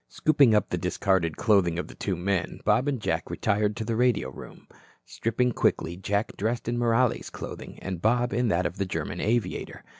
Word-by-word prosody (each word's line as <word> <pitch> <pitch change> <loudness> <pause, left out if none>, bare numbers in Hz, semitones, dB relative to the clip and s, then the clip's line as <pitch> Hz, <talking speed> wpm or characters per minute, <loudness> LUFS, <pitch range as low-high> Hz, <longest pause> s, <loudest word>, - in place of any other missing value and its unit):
Scooping 140 -7 +4
up 105 - +2
the 90 - -1
discarded 90 -2 0
clothing 95 -6 +3
of 90 - -3
the - - -11
two 95 - -2
men, 90 0 -2
Bob 130 - +3
and 140 -4 0
Jack 80 -5 -2
retired 105 +1 0
to 115 - -4
the 115 0 -1
radio 115 - +1
room. - - -12 0.4
Stripping 125 +2 0
quickly, 85 -6 0
Jack 100 +4 -2
dressed 115 +4 -2
in 120 - 0
Morales' 120 +1 +1
clothing - - -8
and 95 -3 -4
Bob 120 +3 +2
in 125 0 +1
that 90 -3 +1
of 90 - -3
the 100 - 0
German - - -3
aviator. 115 +1 -1
105 Hz, 190 wpm, -27 LUFS, 90-120 Hz, 0.4 s, Scooping